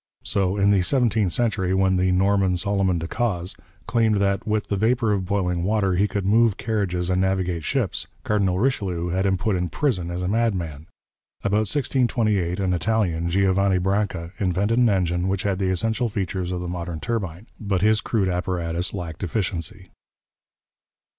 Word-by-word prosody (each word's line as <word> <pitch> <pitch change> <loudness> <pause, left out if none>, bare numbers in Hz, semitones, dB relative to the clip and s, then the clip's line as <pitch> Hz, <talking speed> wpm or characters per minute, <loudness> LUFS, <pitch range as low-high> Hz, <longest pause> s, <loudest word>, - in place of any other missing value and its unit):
So 95 0 0
in 100 0 +4
the 100 -2 +4
seventeenth 110 -3 +2
century, 100 -5 0
when 95 0 +3
the 90 0 +2
Norman, 95 0 +2
Solomon 95 -1 +1
de 80 0 -4
Caus, 95 -6 -2 0.3
claimed 115 -2 +2
that 100 0 0
with 105 -1 0
the 100 - -2
vapour 115 +2 +1
of 95 -3 -1
boiling 90 -3 0
water 100 -1 +1
he 100 +4 +2
could 100 -2 -3
move 110 +1 +3
carriages 95 -5 -1
and 90 0 +2
navigate 95 -3 0
ships, 125 - -1 0.2
Cardinal 100 -4 +1
Richelieu 95 -7 -1
had 95 +3 0
him 95 -1 +2
put 105 +1 0
in 90 -1 -1
prison 90 - -1
as 90 +1 -3
a - - -1
madman. 90 -9 -1 0.6
About 105 +1 +1
1628 110 - +1
an 95 -2 +1
Italian, 90 -4 0
Giovanni 95 +1 +2
Branca, 95 -2 -1
invented 100 +5 +1
an 120 -2 +5
engine 90 -2 0
which 95 0 -1
had 100 -2 -1
the 95 -1 0
essential 115 +6 0
features 95 -3 -3
of 90 -1 -3
the 90 - -4
modern 85 -2 -4
turbine, 95 0 -3
but 100 -4 -1
his 110 0 +4
crude 105 -5 0
apparatus 90 0 -2
lacked 85 -3 -6
efficiency. 90 -1 -3
95 Hz, 170 wpm, -23 LUFS, 90-105 Hz, 0.6 s, an